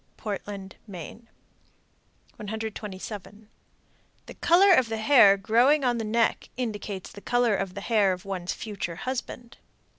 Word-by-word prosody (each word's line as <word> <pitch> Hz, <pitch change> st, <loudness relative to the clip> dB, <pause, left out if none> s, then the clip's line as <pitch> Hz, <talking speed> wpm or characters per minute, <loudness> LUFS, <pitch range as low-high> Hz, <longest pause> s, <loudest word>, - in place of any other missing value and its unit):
Portland, 200 Hz, -2 st, -6 dB
Me. 185 Hz, +2 st, -9 dB, 1.2 s
127. 210 Hz, -1 st, -7 dB, 0.8 s
The -, -, -10 dB
color 375 Hz, +3 st, +5 dB
of 260 Hz, -8 st, +3 dB
the 225 Hz, -, -2 dB
hair 220 Hz, -4 st, +6 dB
growing 240 Hz, +8 st, +3 dB
on 240 Hz, -2 st, +1 dB
the -, -, -2 dB
neck 225 Hz, +1 st, 0 dB
indicates 205 Hz, -5 st, -4 dB
the 205 Hz, -, -12 dB
color 245 Hz, -2 st, +2 dB
of 195 Hz, -2 st, -3 dB
the 200 Hz, -, -5 dB
hair 210 Hz, -3 st, +2 dB
of 180 Hz, 0 st, -5 dB
one's 185 Hz, -2 st, -4 dB
future 200 Hz, -6 st, -5 dB
husband. 245 Hz, +2 st, -6 dB
215 Hz, 130 wpm, -26 LUFS, 195-235 Hz, 1.2 s, hair